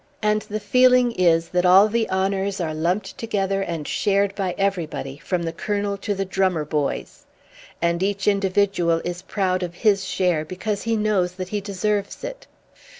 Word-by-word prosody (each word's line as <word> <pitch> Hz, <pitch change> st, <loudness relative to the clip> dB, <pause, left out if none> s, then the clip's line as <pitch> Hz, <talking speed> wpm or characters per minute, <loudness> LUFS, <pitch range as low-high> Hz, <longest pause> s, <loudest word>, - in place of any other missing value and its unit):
and 210 Hz, 0 st, +2 dB
the 215 Hz, +1 st, -2 dB
feeling 250 Hz, +3 st, +4 dB
is 170 Hz, -5 st, +2 dB
that 180 Hz, 0 st, +1 dB
all 185 Hz, +3 st, +7 dB
the 225 Hz, +1 st, 0 dB
honours 195 Hz, +1 st, 0 dB
are 160 Hz, -3 st, -2 dB
lumped 175 Hz, +6 st, -1 dB
together 195 Hz, -3 st, -1 dB
and 165 Hz, -5 st, -4 dB
shared 200 Hz, 0 st, +1 dB
by 190 Hz, -3 st, -2 dB
everybody, 170 Hz, -8 st, -2 dB
from 175 Hz, +1 st, -2 dB
the 165 Hz, -1 st, -3 dB
Colonel 205 Hz, +2 st, -2 dB
to 205 Hz, +1 st, -3 dB
the 195 Hz, 0 st, -2 dB
drummer 185 Hz, -4 st, 0 dB
boys. 150 Hz, -2 st, -3 dB, 0.6 s
And 170 Hz, +1 st, +1 dB
each 200 Hz, 0 st, -1 dB
individual 195 Hz, -4 st, +2 dB
is 175 Hz, 0 st, -4 dB
proud 185 Hz, -1 st, -1 dB
of 175 Hz, -1 st, -4 dB
his 200 Hz, 0 st, +2 dB
share 180 Hz, -5 st, 0 dB
because 195 Hz, +5 st, -4 dB
he 230 Hz, -1 st, 0 dB
knows 205 Hz, -4 st, +1 dB
that 185 Hz, 0 st, -6 dB
he 210 Hz, 0 st, -2 dB
deserves 200 Hz, +1 st, -2 dB
it. -, -, -7 dB
195 Hz, 170 wpm, -23 LUFS, 180-205 Hz, 0.6 s, all